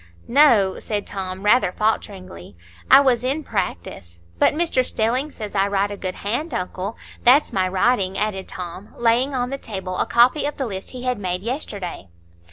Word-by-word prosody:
"No," 235 -9 +4
said 205 -2 -3
Tom, 190 -1 -6
rather 210 -2 +4
falteringly. 190 - -3 0.3
"I 270 - +9
was 250 -4 +2
in 275 +5 -1
Practice. 85 - -5 0.2
But - - +4
Mr 320 -6 +1
Stelling 250 +6 -1
says 210 -5 -7
I 195 -1 +2
write 200 0 0
a - - -4
good 185 -2 -5
hand, 245 +8 -3
uncle. 185 +2 -4 0.3
That's 260 +5 +5
my 185 -1 +1
writing," 190 0 +1
added 205 -3 -2
Tom, 180 +2 -8
laying 240 +4 +2
on 250 0 -1
the 275 - -4
table 190 -5 -5
a - - +1
copy 255 +5 +4
of 295 - -5
the 270 - -2
list 195 -4 -6
he 250 -1 -8
had 250 -3 -1
made 180 -1 -3
yesterday. 205 - -4
210 Hz, 175 wpm, -22 LUFS, 190-250 Hz, 0.3 s, I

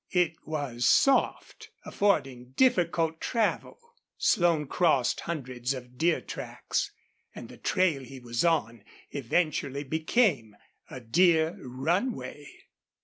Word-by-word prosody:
It 180 -3 +2
was 140 -6 -1
soft, 275 -4 +2 0.2
affording 135 -11 0
difficult 170 -10 +2
travel. 230 -3 -1 0.4
Slone 170 -4 +2
crossed 140 -5 +1
hundreds 130 -5 -4
of 125 0 -11
deer 170 0 +2
tracks, - - -4 0.4
and - - -9
the - - -12
trail 170 -7 +1
he 130 +1 -10
was 120 -1 -2
on 120 -10 0 0.3
eventually 140 0 -1
became 155 - +1 0.3
a 130 - -8
deer 160 +6 +3
runway. 150 - -3
155 Hz, 105 wpm, -28 LUFS, 125-175 Hz, 0.4 s, deer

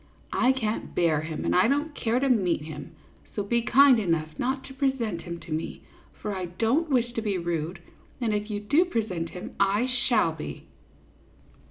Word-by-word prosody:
I 250 - +4
can't 225 -4 -3
bear 160 -3 +3
him, 155 0 -4
and - - +2
I 185 +4 +5
don't 290 +4 0
care 240 -3 0
to 275 - +1
meet 190 - +2
him; 155 +1 -8 0.4
so 205 - 0
be 235 +4 +1
kind 260 +1 +6
enough 165 -6 0
not 265 +2 -1
to 265 - -10
present 265 -10 -1
him 170 -1 -6
to 165 - -11
me, 155 +1 -3 0.4
for 210 -2 -3
I 185 -1 -3
don't 230 - 0
wish 240 -3 +1
to 225 - -2
be 205 -3 -1
rude, 170 0 -2 0.4
and 230 -4 0
if 210 +1 -2
you 205 -1 -2
do 285 +11 +4
present 210 - -2
him, 180 - -8
I 200 +4 +3
shall 245 -8 +1
be." 155 -1 -7
215 Hz, 190 wpm, -27 LUFS, 170-250 Hz, 0.4 s, kind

